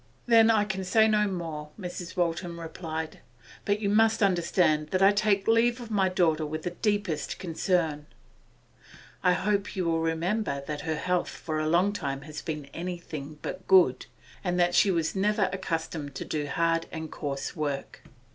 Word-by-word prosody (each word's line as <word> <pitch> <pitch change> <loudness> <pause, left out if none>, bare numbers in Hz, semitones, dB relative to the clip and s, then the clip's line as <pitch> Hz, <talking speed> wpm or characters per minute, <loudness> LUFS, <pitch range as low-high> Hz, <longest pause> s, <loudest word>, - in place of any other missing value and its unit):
'Then 230 -2 +6
I 215 -2 +4
can 190 -2 -3
say 220 +4 +4
no 210 -1 +3
more,' 165 -5 -5
Mrs. 180 -1 -6
Waltham 170 0 -1
replied. 160 -1 -5 0.5
'But 205 +1 +1
you 205 - 0
must 220 +1 +3
understand 170 -4 +2
that 185 +4 +1
I 195 - +7
take 205 -1 +1
leave 230 +2 +3
of 235 -2 -8
my 195 -3 +2
daughter 165 -4 +2
with 155 +1 -4
the 175 - -2
deepest 205 -5 -1
concern. 165 -4 -1 1.1
I 180 - +4
hope 200 +1 -1
you 185 -2 -1
will 165 -1 +1
remember 165 -1 -1
that 150 0 -4
her 160 0 -2
health 180 +2 0
for 155 -1 -4
a 155 0 0
long 180 +5 +3
time 140 -8 -3
has 155 +1 -8
been 150 -3 -4
anything 165 -4 -6
but 185 0 -6
good, 180 -9 +5 0.4
and 180 -1 0
that 175 0 +3
she 200 - +5
was 165 -2 0
never 200 -1 +1
accustomed 160 -6 -3
to - - -5
do 150 -2 -2
hard 165 +3 +1
and 160 -1 -6
coarse 140 -2 -4
work. 145 -4 -4
175 Hz, 175 wpm, -28 LUFS, 155-200 Hz, 1.1 s, I